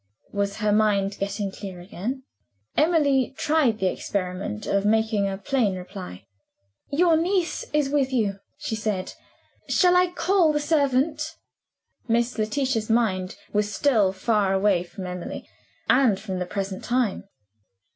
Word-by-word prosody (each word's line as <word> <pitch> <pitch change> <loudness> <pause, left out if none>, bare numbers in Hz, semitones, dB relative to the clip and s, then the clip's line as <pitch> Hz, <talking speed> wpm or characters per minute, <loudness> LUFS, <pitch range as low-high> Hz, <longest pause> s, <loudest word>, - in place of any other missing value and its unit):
Was 200 -1 -1
her 210 -1 0
mind 205 -2 +2
getting 200 0 -2
clear 190 -2 -8
again? 210 +9 -5 0.5
Emily 285 -5 +3
tried 295 -8 +2
the 190 - -1
experiment 185 - -3
of 200 0 +1
making 215 -1 +2
a 195 - -4
plain 220 -2 0
reply. 185 - -8 0.7
"Your 330 +3 +4
niece 350 +2 0
is 300 -2 +2
with 275 -3 +1
you," 210 -6 0 0.2
she 220 - -3
said. 215 -4 -2 0.6
"Shall 360 -1 +4
I 360 0 +5
call 360 -3 +2
the 295 - +1
servant?" 295 +1 +1 0.7
Miss 235 +1 +1
Letitia's 225 0 0
mind 195 -5 +1 0.2
was 210 0 +1
still 215 -4 +3
far 195 0 +1
away 195 -2 +3
from 185 +1 -8
Emily, 180 -1 -6 0.4
and 245 -7 +4
from 190 -3 -4
the 180 - -3
present 195 0 -4
time. 245 -5 0
215 Hz, 135 wpm, -25 LUFS, 195-275 Hz, 0.7 s, I